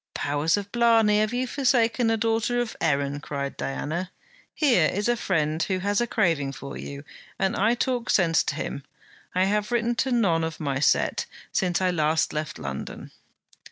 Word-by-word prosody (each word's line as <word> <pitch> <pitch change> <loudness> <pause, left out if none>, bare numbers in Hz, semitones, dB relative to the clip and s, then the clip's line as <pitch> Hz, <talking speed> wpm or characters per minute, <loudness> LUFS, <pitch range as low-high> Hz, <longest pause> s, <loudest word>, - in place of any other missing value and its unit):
'Powers 145 +5 +1
of 200 0 -5
blarney, 225 -3 +4
have 215 0 +1
you 250 +1 -1
forsaken 245 -3 +2
a 225 - +2
daughter 225 +2 0
of 240 -2 -2
Erin?' 140 -2 0
cried 140 -1 -4
Diana. 165 +6 -3 0.5
'Here 240 - +4
is 205 +3 -1
a 240 - +3
friend 160 -7 0
who 190 +3 0
has 200 +3 0
a 240 - 0
craving 165 -12 +1
for 140 +1 -8
you, 140 0 -7 0.3
and 195 -1 0
I 225 +4 +2
talk 245 -1 -1
sense 165 -4 +3
to - - -2
him. 140 - -4 0.5
I 185 - +3
have 210 +2 0
written 240 0 +1
to 265 - 0
none 190 -9 +2
of 160 -1 -4
my 140 -4 -1
set 145 - +2 0.2
since 180 -1 0
I 185 -1 +2
last 155 -1 +1
left 150 0 -4
London.' 70 -1 -6
190 Hz, 180 wpm, -25 LUFS, 155-230 Hz, 0.5 s, blarney